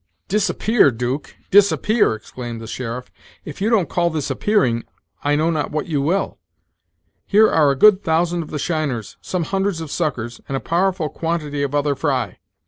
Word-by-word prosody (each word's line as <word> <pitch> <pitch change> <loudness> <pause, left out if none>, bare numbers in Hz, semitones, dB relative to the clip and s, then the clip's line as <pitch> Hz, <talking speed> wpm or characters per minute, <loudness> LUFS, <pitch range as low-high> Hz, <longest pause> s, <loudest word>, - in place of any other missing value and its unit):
"Disappear, 215 -1 +3
Duke! 125 +4 -4 0.2
disappear!" 205 - +4
exclaimed 120 +1 -7
the 115 - -8
sheriff 125 +2 -5 0.3
"if 150 +4 -8
you 210 - +2
don't 210 -8 +3
call 170 +3 +1
this 155 -3 -3
appearing, 130 - +1 0.4
I 145 0 +2
know 160 +3 +2
not 155 -2 -1
what 155 0 -2
you 150 -4 -1
will. 175 +8 -1 0.9
Here 215 +2 +6
are 150 -3 +3
a 140 - +2
good 205 +6 +6
thousand 170 +2 +1
of 155 - -8
the 150 - -4
shiners, 145 - -2
some 180 -2 -2
hundreds 195 +1 -1
of 160 -3 -6
suckers, 120 -8 -3
and 135 - -2
a - - -2
powerful 180 0 0
quantity 150 -2 -3
of 140 0 -1
other 145 0 +2
fry. 130 - -2
155 Hz, 175 wpm, -20 LUFS, 135-180 Hz, 0.9 s, Here